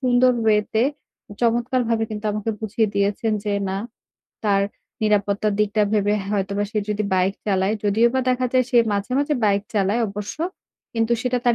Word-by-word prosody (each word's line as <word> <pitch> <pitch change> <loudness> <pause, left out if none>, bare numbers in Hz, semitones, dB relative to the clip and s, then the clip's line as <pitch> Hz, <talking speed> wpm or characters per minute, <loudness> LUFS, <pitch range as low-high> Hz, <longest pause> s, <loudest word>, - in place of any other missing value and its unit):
সুন্দর 250 -1 +4
ওয়েতে 215 +1 +2 0.6
চমৎকারভাবে 235 -1 +1
কিন্তু 210 0 -6
আমাকে 210 +1 -2
বুঝিয়ে 220 +1 0
দিয়েছেন 205 +2 +1
যে 205 - -1 0.2
না, 190 - -2 0.7
তার 200 -1 +3 0.4
নিরাপত্তার 210 0 +1
দিকটা 210 0 +2
ভেবে 205 -1 +2 0.2
হয়তোবা 200 0 -1
সে 215 - -1
যদি 210 0 0
বাইক 185 +1 +2
চালায় 195 +1 +1
যদিও 220 +4 +4
বা 260 - +3
দেখা 255 0 +1
যায় 255 -1 +4
সে 245 - +2 0.2
মাঝে, 200 +4 -2
মাঝে 290 +1 +1
বাইক 200 -1 +2
চালায় 205 +3 +2
অবশ্য 205 +4 -6 0.6
কিন্তু 225 +1 +1
সেটা 250 0 0
তার 240 - +4
210 Hz, 160 wpm, -22 LUFS, 200-235 Hz, 0.7 s, সুন্দর